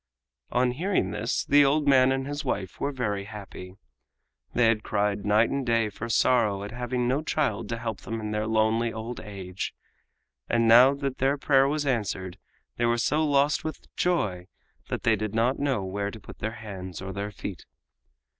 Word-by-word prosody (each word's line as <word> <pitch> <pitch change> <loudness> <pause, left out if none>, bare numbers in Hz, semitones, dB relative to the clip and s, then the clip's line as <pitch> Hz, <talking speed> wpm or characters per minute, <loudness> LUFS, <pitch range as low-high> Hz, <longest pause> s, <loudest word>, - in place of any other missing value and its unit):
On 125 0 +2
hearing 180 +10 0
this 115 +5 -1
the 145 0 +6
old 145 +1 +2
man 130 -2 +6
and 135 0 -1
his 145 +2 -4
wife 100 -8 -3
were 140 - -1
very 105 -7 -2
happy. 95 -3 -9 0.8
They 125 - +4
had 115 -1 +3
cried 105 -1 -1
night 105 +2 +4
and 140 0 -1
day 115 -3 +1
for 110 +3 -7
sorrow 105 -4 +2
at 105 - -6
having 125 +1 -2
no 135 +4 +1
child 125 -9 -1
to 115 - -2
help 115 -3 -4
them 115 0 -4
in 105 -1 -4
their 105 0 -1
lonely 110 +1 +2
old 110 +2 -6
age, 95 -2 -6 0.7
and 115 -1 +2
now 125 +4 +7
that 140 -2 -4
their 135 +2 +2
prayer 135 -1 +4
was 150 +1 -1
answered 100 -8 -2 0.4
they 120 - +1
were 120 0 +2
so 150 +6 +1
lost 145 +2 +2
with 155 - -7
joy 100 - 0 0.4
that - - -3
they 115 - +4
did 110 0 -4
not 120 +4 +2
know 135 -7 0
where 100 +2 -2
to 110 - -9
put - - -13
their 110 +2 -3
hands 95 -5 -7
or 95 0 -6
their 100 +2 -3
feet. 100 - -8
115 Hz, 190 wpm, -27 LUFS, 105-135 Hz, 0.8 s, now